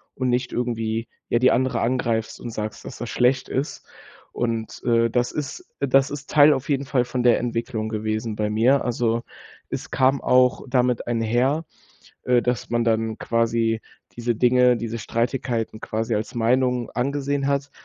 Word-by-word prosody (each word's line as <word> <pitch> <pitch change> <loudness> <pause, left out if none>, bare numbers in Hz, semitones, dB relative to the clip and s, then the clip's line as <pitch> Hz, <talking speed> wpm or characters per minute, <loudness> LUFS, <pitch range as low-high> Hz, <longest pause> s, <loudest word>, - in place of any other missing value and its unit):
und 130 -1 -1
nicht 125 +1 0
irgendwie, 115 -2 -2 0.2
ja, 120 - +2
die 130 +1 +5
andere 130 +1 +1
angreifst 115 -2 -1
und 120 - -6
sagst, 110 -1 -5
dass - - -8
das 120 - -5
schlecht 130 +1 +1
ist. 135 +3 -3 0.5
Und, 115 -2 -3
äh, 115 -1 +3
das 120 +1 0
ist 250 - -5
das 135 0 +3
ist 145 -1 -7
Teil 150 0 +7
auf 135 +1 -4
jeden 140 -1 0
Fall 130 -2 +1
von 125 0 -3
der 120 -1 +5
Entwicklung 115 -2 -3
gewesen 110 0 -2
bei 105 0 -1
mir. 125 +6 +3
Also, 115 -1 0 0.5
es - - -5
kam 130 +2 +2
auch 125 0 +3
damit 125 -2 +1
einher, 120 +7 +1 0.6
äh, 125 -1 +3
dass 125 -2 -2
man 120 0 +1
dann 110 -1 0
quasi 115 -1 +1 0.3
diese 120 0 -1
Dinge, 125 0 +4
diese 115 0 -4
Streitigkeiten 115 -1 -2
quasi 110 +1 -2
als 110 +4 -3
Meinung 125 +1 +1
angesehen 140 +2 -1
hat 140 0 -1
120 Hz, 165 wpm, -23 LUFS, 115-130 Hz, 0.6 s, Teil